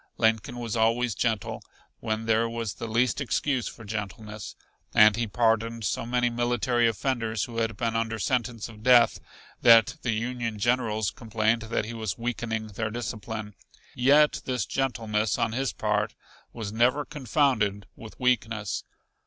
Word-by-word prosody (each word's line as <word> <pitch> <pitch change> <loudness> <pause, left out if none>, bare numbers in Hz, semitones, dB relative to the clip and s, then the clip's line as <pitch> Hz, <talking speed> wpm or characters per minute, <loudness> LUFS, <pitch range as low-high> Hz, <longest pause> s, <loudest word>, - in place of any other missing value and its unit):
Lincoln 110 +3 +1
was 115 -2 -4
always 115 +1 +2
gentle 110 -2 -1 0.4
when 110 -1 -2
there 115 +1 +2
was 115 -2 -3
the 115 - -6
least 120 +4 +1
excuse 135 -1 0
for 115 - -9
gentleness, 105 0 -6 0.4
and 105 -1 +7
he 115 0 -1
pardoned 115 +1 +1
so 105 - -2
many 125 0 +1
military 120 0 +1
offenders 115 -2 -1
who 115 -1 -6
had 115 -2 -1
been 115 0 -1
under 115 0 -1
sentence 120 +1 -1
of 110 -2 -13
death 120 0 +5 0.4
that 115 +5 +6
the 120 - -3
Union 115 0 -3
Generals 110 -2 +1
complained 110 +1 0
that 115 - 0
he 115 - -6
was 110 -4 -3
weakening 115 -2 -3
their 110 +2 -3
discipline. 110 -1 -5 0.4
Yet 145 +4 +4
this 125 -5 -1
gentleness 110 -5 -1
on 115 -1 0
his 130 +2 -1
part 105 0 -1 0.4
was 110 -3 -6
never 125 +6 +2
confounded 125 -8 0
with 110 -1 -12
weakness. 110 -4 0
115 Hz, 150 wpm, -27 LUFS, 110-120 Hz, 0.4 s, and